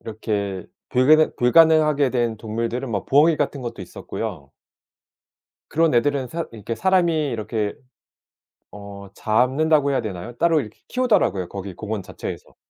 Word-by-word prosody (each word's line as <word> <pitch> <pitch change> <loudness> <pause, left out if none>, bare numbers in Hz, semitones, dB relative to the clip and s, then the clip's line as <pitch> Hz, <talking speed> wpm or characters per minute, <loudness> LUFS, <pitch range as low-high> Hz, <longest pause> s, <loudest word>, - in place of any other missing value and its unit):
이렇게 100 -4 -4 0.2
불가능 155 +5 +4
불가능하게 150 +1 +4
된 120 -3 0
동물들은 115 +3 -3
뭐 100 -4 -2
부엉이 150 +3 +4
같은 145 -1 -2
것도 120 -5 -6
있었고요 70 -5 -7 1.2
그런 165 -2 +2
애들은 135 +1 +1
사 170 +4 -4
이렇게 115 +1 -5
사람이 170 -4 +2
이렇게 110 -2 -3 1.0
어 100 0 -10
잡는다고 140 +8 +2
해야 135 - +1
되나요? 105 +3 -7
따로 165 -2 +3
이렇게 110 -6 -8
키우더라고요 210 - +1
거기 100 -1 -7
공원 110 +2 -5
자체에서. - - -8
125 Hz, 340 characters per minute, -22 LUFS, 105-155 Hz, 1.2 s, 불가능